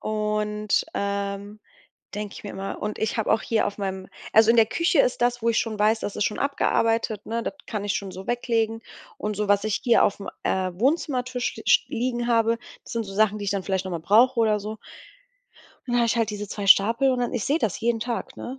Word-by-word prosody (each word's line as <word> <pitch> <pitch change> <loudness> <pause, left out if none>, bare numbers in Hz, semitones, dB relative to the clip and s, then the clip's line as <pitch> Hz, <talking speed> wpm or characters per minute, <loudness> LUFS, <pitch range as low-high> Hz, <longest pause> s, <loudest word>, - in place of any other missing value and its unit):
und, 210 -1 -1
ähm, 200 +1 -3 0.5
denke 210 -1 -5
ich - - -11
mir 205 - -5
immer 195 +1 -6
und 210 0 -4
ich 220 +1 -1
habe 220 - 0
auch 220 - +3
hier 225 -2 +1
auf 200 - -4
meinem 190 -1 -4 0.2
also 220 0 +6
in 235 - +4
der 225 - +7
Küche 335 - +2
ist 250 - +1
das, 245 -1 +1
wo 230 - +3
ich 225 - +1
schon 220 -2 -2
weiß, 220 +2 +3
das 205 - -4
ist - - 0
schon 210 - -1
abgearbeitet, 230 -6 0
ne? 230 +1 -2
Das - - -3
kann 210 -3 -4
ich 205 - -1
schon 195 -2 -4
so 190 +1 -9
weglegen 225 -2 0 0.4
und 210 -1 -3
so 210 0 -2
was 205 0 +3
ich 215 -1 -1
hier 240 -2 +4
aufm, 200 -1 -2 0.2
äh, 185 -1 0
Wohnzimmertisch 255 - 0
ste - - -10
sch - - +5
liegen 240 -2 -2
habe, 230 -1 +2 0.3
das - - -10
sind 230 - -1
so 195 - -9
Sachen, 215 0 +2
die 205 - -5
ich 195 - -1
dann 195 -2 -2
vielleicht 190 -1 -1
noch 185 - -5
mal 170 - -3
brauche 235 +7 +4
oder 215 -2 +2
so. 215 +2 -6 1.1
Und 245 - -4
dann 245 - +3
habe 235 - +3
ich 235 - +1
halt 225 -2 +1
diese 210 -1 -5
2 205 -1 -5
Stapel 230 +7 +5
und 250 - -1
dann 245 - -1
ich 240 -5 -2
sehe 295 +4 +1
das 220 - -1
jeden 230 0 0
Tag, 240 0 -4
ne? 260 +2 -7
220 Hz, 240 wpm, -24 LUFS, 205-235 Hz, 1.1 s, der